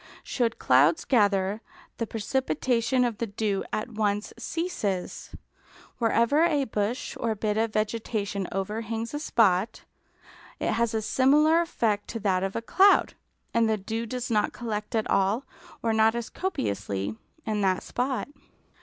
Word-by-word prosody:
Should 235 -3 -1
clouds 140 +6 +4
gather, 205 -3 +2 0.4
the 230 - -2
precipitation 250 +2 0
of 230 -4 -3
the 230 - -1
dew 205 -1 -1
at 215 - -2
once 210 -1 -1
ceases. 215 - -3 0.7
Wherever 235 +6 +3
a 305 -5 +2
bush 215 0 -2
or 230 -2 0
bit 210 0 -1
of 220 0 0
vegetation 215 -3 -2
overhangs 225 +4 -3
a 295 - -2
spot, 215 - +2 0.8
it - - 0
has 230 -1 0
a 220 - -1
similar 300 +8 +4
effect 220 -11 -1
to 230 - -5
that 190 -3 +1
of 195 0 -2
a 230 - -2
cloud, 390 +11 +4 0.4
and 230 -1 +3
the 220 - +2
dew 225 +3 -4
does 250 +1 -4
not 210 -2 +1
collect 215 -1 -4
at 220 - 0
all, 200 +6 +2 0.4
or 225 -1 +1
not 220 +1 +4
as 235 -1 -4
copiously, 100 - -2 0.3
in 215 -1 -1
that 185 -2 +1
spot. 250 -3 -2
220 Hz, 145 wpm, -27 LUFS, 205-240 Hz, 0.8 s, clouds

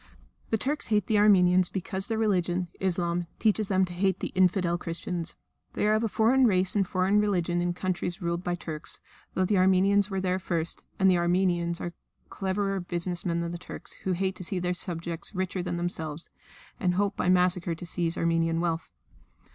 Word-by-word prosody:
The 220 - +2
Turks 285 +7 -2
hate 210 -3 +2
the 215 -2 +2
Armenians 185 -3 +5
because 190 +1 -3
their 225 - -1
religion, 180 -5 0
Islam, 175 -2 0
teaches 215 -1 +2
them 190 -1 +3
to 180 - -9
hate 190 +1 +1
the - - -4
"infidel" 185 -2 +2
Christians; 170 0 -4 0.4
they - - 0
are 210 - +4
of 215 +1 +1
a - - +2
foreign 245 +5 +4
race 185 -2 +3
and 195 -3 +2
foreign 185 +3 +2
religion 175 -4 +1
in 175 0 -1
countries 180 0 -2
ruled 170 -1 -2
by 175 -1 -1
Turks, 160 -3 -6 0.4
though 185 - +2
the 195 0 +2
Armenians 195 +2 +4
were 195 -1 -2
there 185 0 0
first, 170 -3 -3 0.2
and 190 - +4
the 180 -2 +4
Armenians 175 -1 +1
are 175 - -5 0.4
cleverer 195 0 -1
business 175 0 -2
men 170 0 0
than 170 0 -3
the 175 - -6
Turks, - - -8
who 190 - 0
hate 190 +1 -1
to - - -7
see 185 +2 -3
their 180 0 0
subjects 170 +1 -4
richer 185 0 -2
than 175 - -3
themselves, 165 -2 -4 0.5
and 180 -5 +1
hope 200 +1 +1
by 180 - 0
massacre 180 -1 +2
to 170 - -9
seize 170 -1 -1
Armenian 165 0 +1
wealth. 165 -1 -1
180 Hz, 195 wpm, -28 LUFS, 175-195 Hz, 0.5 s, Armenians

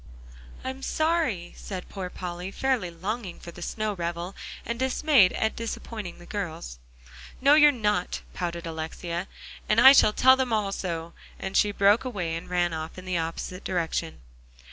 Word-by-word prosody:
"I'm 260 +1 -5
sorry," 310 - 0
said 185 -3 -7
poor 190 -3 -5
Polly, 180 0 -5
fairly 250 -3 0
longing 190 +3 -5
for 170 - -9
the 175 - -12
snow 215 +4 -2
revel, 175 +1 -4 0.3
and 235 0 -3
dismayed 260 -5 +4
at 220 - 0
disappointing 225 -4 -5
the 175 - -13
girls. 160 - -5 0.6
"No, 280 +2 +6
you're 295 -1 +8
not," 210 -7 -1
pouted 170 -1 -4
Alexia, 170 +2 -4 0.4
"and 215 - +4
I 265 +3 +10
shall 215 - +6
tell 260 +3 +6
them 260 -2 -1
all 210 -3 +1
so," 170 -3 -4 0.2
and 190 - -5
she 205 - +4
broke 200 +2 +4
away 185 -10 -3
and 165 - -7
ran 175 -1 +1
off 160 +1 -5
in 185 - -9
the 180 -2 0
opposite 165 +3 -4
direction. 165 -2 -2
190 Hz, 165 wpm, -27 LUFS, 170-230 Hz, 0.6 s, I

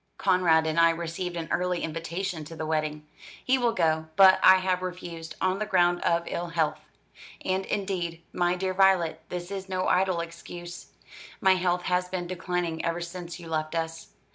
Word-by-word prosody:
"Conrad 165 -3 +3
and 160 +1 0
I 165 0 +7
received 170 +2 -3
an 165 -1 -4
early 180 -1 0
invitation 165 +2 -4
to 165 - -9
the 160 - -4
wedding. 155 -1 -2 0.4
He 260 0 +3
will 240 -1 +2
go; 160 -5 +1
but 190 +1 +7
I 185 - +9
have 185 -1 0
refused, 175 -3 -6
on 185 +1 0
the 215 - -1
ground 175 -3 +3
of 170 0 +2
ill 175 +1 -3
health. 165 -2 0 0.7
And, 190 0 -1
indeed, 180 -5 -3
my 175 0 +1
dear 185 +1 -2
Violet, 185 -4 +3
this 180 +1 -5
is 195 -1 -5
no 185 0 -1
idle 185 -1 +2
excuse. 175 +1 -9 0.5
My 190 0 +5
health 180 -1 0
has 180 0 0
been 180 -1 -3
declining 175 -2 -3
ever 165 +1 -1
since 175 0 -7
you 170 - -10
left 155 0 -2
us. 165 0 -3
175 Hz, 180 wpm, -27 LUFS, 165-185 Hz, 0.7 s, I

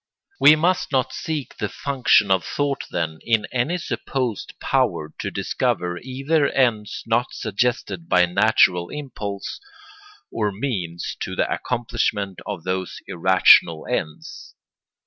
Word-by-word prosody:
We 150 - +8
must 175 +4 +1
not 130 -1 +1
seek 155 -4 -4
the 105 -3 -2
function 125 -7 +2
of 95 -3 +3
thought, 140 -2 -2
then, 80 -2 -3
in 110 -2 +1
any 130 +8 0
supposed 130 - -4
power 75 0 0
to - - -2
discover 90 0 -1
either 140 +4 0
ends 115 -6 0
not 115 +2 +1
suggested 125 - -2
by 90 -1 +5
natural 90 0 +3
impulse 105 -9 -6 0.7
or 105 -2 -1
means 95 -7 -4
to - - -4
the - - +1
accomplishment 115 -5 -2
of 100 -6 -5
those 95 0 -3
irrational 85 -2 +4
ends. 80 -1 -5
110 Hz, 125 wpm, -22 LUFS, 95-135 Hz, 0.7 s, We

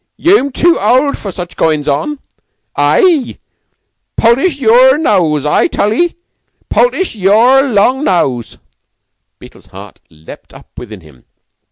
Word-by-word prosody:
Yeu'm 340 -6 +1
tu 340 +6 +1
old 270 +3 +1
for 200 - -8
such 180 0 -9
goin's 155 -2 -1
on. 150 - -2 0.6
Aie! 340 - +1 0.8
Poultice 270 +7 +1
yeour 255 +3 +4
nose, 165 - 0
I 150 - +1
tall 210 +1 -1
'ee! 345 +8 -1 0.5
Poultice 435 -6 0
yeour 225 +6 +3
long 255 +1 0
nose!" 130 -10 -2 0.8
Beetle's - - -17
heart - - -13
leaped 80 0 -15
up - - -16
within 110 -5 -11
him. 75 -6 -20
230 Hz, 125 wpm, -12 LUFS, -, 0.8 s, yeour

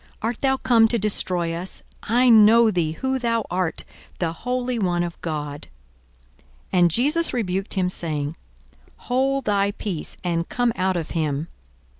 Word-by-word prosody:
art 230 +1 -2
thou 265 -1 +2
come 230 -3 +4
to 235 - 0
destroy 180 -5 0
us? 175 +3 -5 0.2
I 245 +3 +2
know 225 0 +7
thee 165 -5 0
who 265 +8 -2
thou 230 -2 0
art; 180 -2 0 0.3
the 165 -2 -1
Holy 250 +5 -2
One 175 -3 +1
of 170 -1 -6
God. 150 -3 -4 1.1
42:004:035 185 - +3
And 175 -1 +5
Jesus 295 - +1
rebuked 195 -4 -2
him, 185 -2 +1
saying, 155 -4 -2 0.6
Hold 270 +2 0
thy 200 -1 +2
peace, 200 -5 -4
and 170 -1 -1
come 245 -2 +1
out 185 -1 0
of 165 -2 -4
him. 155 -1 -2
195 Hz, 155 wpm, -23 LUFS, 170-240 Hz, 1.1 s, know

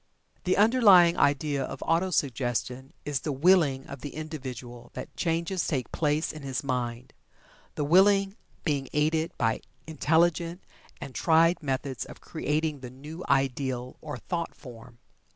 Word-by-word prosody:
The 185 - +2
underlying 205 -6 +6
idea 145 0 +1
of 135 - -6
Auto 170 +3 +2
suggestion 130 -3 -1
is 145 -2 -1
the 150 - -3
"willing" 145 -2 +3
of 140 -2 -9
the 145 - -7
individual 130 -6 -7
that - - -6
the - - -39
changes 170 +2 -1
take 130 -6 -2
place 150 0 0
in 155 - -9
his 135 -1 -3
mind, 125 -2 -3 0.6
the 150 - -1
willing 195 +5 +4 0.3
being 140 -5 -1
aided 155 +3 +1
by 115 -1 0 0.2
intelligent 165 +3 +1 0.4
and 140 -2 -8
tried 165 +7 +3
methods 135 -2 -3
of - - -12
creating 150 0 -2
the 125 -1 -8
new 150 +7 -9
ideal 130 -2 0
or 150 -3 -6
thought 170 +6 -4
form. 120 -2 -13
150 Hz, 145 wpm, -28 LUFS, 130-165 Hz, 0.6 s, underlying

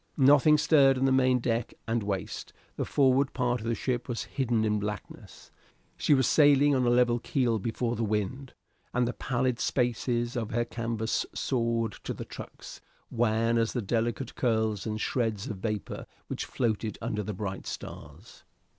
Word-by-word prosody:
Nothing 145 +2 +6
stirred 145 -4 +5
on 130 - +1
the 135 - +3
main 130 -1 +4
deck 115 -1 -2
and 115 0 0
waist; 100 -2 -4 0.2
the - - -2
forward 135 -1 +3
part 125 -2 0
of 115 - -5
the 115 - +1
ship 125 0 -2
was 120 - -2
hidden 120 -5 0
in 105 -1 +1
blackness. 105 0 -7 0.4
She 145 - +3
was 130 -2 +3
sailing 145 +1 +5
on 130 -2 +2
a - - +4
level 120 0 +3
keel 120 -3 0
before 115 +3 -2
the 115 - -2
wind, 110 +5 -2 0.4
and 125 -1 +2
the 120 - -2
pallid 125 -1 -1
spaces 120 -1 0
of 115 -3 -2
her 120 +1 0
canvas 115 -1 -2
soared 115 -3 0
to - - -4
the - - -6
trucks, - - -10 0.3
wan 115 0 +2
as 115 0 0
the 125 - -1
delicate 115 +4 -1
curls 110 -4 0
and 110 0 -2
shreds 110 -3 -1
of 110 -7 -5
vapor 105 +1 -4 0.2
which - - -3
floated 110 -3 -1
under 110 -2 -2
the 105 0 -4
bright 95 -1 -5
stars. - - -9
120 Hz, 170 wpm, -28 LUFS, 110-130 Hz, 0.4 s, Nothing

